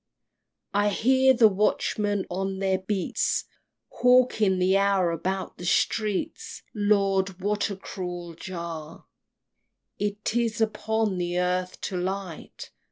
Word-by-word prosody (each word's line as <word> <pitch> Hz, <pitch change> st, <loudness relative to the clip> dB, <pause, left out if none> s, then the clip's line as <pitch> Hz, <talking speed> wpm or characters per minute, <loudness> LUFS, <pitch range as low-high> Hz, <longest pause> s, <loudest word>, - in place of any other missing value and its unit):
XXXVII. 205 Hz, -, +3 dB
I 205 Hz, -, +3 dB
hear 260 Hz, +5 st, +4 dB
the 235 Hz, -2 st, +7 dB
watchmen 205 Hz, 0 st, 0 dB
on 195 Hz, +1 st, -3 dB
their 190 Hz, -1 st, +1 dB
beats, 190 Hz, 0 st, -1 dB, 0.5 s
Hawking 245 Hz, -6 st, +3 dB
the 185 Hz, +1 st, +3 dB
hour 195 Hz, -3 st, +3 dB
about 190 Hz, +3 st, -3 dB
the 175 Hz, -, -6 dB
streets. 210 Hz, +1 st, -1 dB
Lord! 195 Hz, -3 st, +1 dB
what 205 Hz, +3 st, 0 dB
a 200 Hz, -, -4 dB
cruel 180 Hz, -3 st, -6 dB
jar 165 Hz, -3 st, -7 dB, 0.9 s
It 205 Hz, +2 st, -2 dB
is 230 Hz, -2 st, 0 dB
upon 220 Hz, -2 st, 0 dB
the 175 Hz, 0 st, -1 dB
earth 180 Hz, 0 st, -1 dB
to 185 Hz, -, -3 dB
light! 185 Hz, -2 st, -5 dB
195 Hz, 120 wpm, -26 LUFS, 180-210 Hz, 0.9 s, the